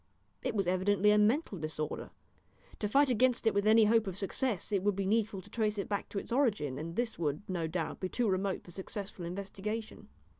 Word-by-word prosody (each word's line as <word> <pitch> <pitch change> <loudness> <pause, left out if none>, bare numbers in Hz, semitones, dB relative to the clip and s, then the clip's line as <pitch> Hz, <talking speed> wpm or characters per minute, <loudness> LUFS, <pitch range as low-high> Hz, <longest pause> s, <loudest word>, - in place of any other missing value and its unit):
It - - -2
was 195 -2 +1
evidently 190 +3 +3
a 210 - +5
mental 215 - +2
disorder. 155 -1 -4 0.7
To 210 - 0
fight 275 +5 +4
against 245 0 +2
it 225 - +4
with 200 +1 +1
any 220 0 +7
hope 225 0 +3
of 190 -1 -4
success 210 +1 -1
it 200 -3 +2
would 205 0 +1
be 195 0 -1
needful 210 -1 +1
to 205 - -15
trace 215 -2 0
it 200 - -2
back 200 -1 -2
to - - -6
its 200 - -5
origin, 210 - +1
and 165 +2 -5
this 235 -3 -2
would, 150 +1 -1
no 175 -3 -1
doubt, 165 0 -3
be 185 - -2
too 240 +2 0
remote 190 0 0
for 175 - -13
successful 195 0 -6
investigation. 200 +4 -5
200 Hz, 215 wpm, -32 LUFS, 185-220 Hz, 0.7 s, any